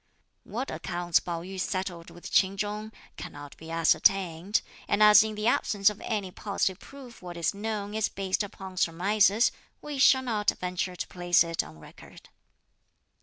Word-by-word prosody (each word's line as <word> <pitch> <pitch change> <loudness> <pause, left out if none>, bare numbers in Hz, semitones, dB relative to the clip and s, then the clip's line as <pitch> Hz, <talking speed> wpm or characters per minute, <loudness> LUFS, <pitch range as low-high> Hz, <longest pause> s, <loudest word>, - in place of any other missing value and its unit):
What 250 +5 -4
accounts 175 -2 0
Pao 170 -1 -5
yü 190 +1 -7
settled 185 -3 -3
with 175 - -11
Ch'in 195 0 +3
Chung 210 +2 -3 0.3
cannot 145 -1 -9
be 160 - -11
ascertained; 170 +3 +2 0.2
and 205 +1 +3
as 210 0 +9
in 215 0 -2
the 210 0 -4
absence 205 -3 +3
of 210 - -12
any 205 -5 -3
positive 195 -1 -2
proof 270 -4 -13
what 175 -1 -8
is 165 -2 0
known 205 0 -4
is 220 -1 0
based 190 0 -2
upon 190 -2 -7
surmises, 200 +6 +3 0.3
we 295 -2 -6
shall 260 0 +6
not 215 -4 0
venture 180 0 -3
to - - -5
place 175 -1 +3
it 165 -1 -1
on 80 - -12
record. 75 - -15
195 Hz, 165 wpm, -28 LUFS, 175-210 Hz, 0.3 s, as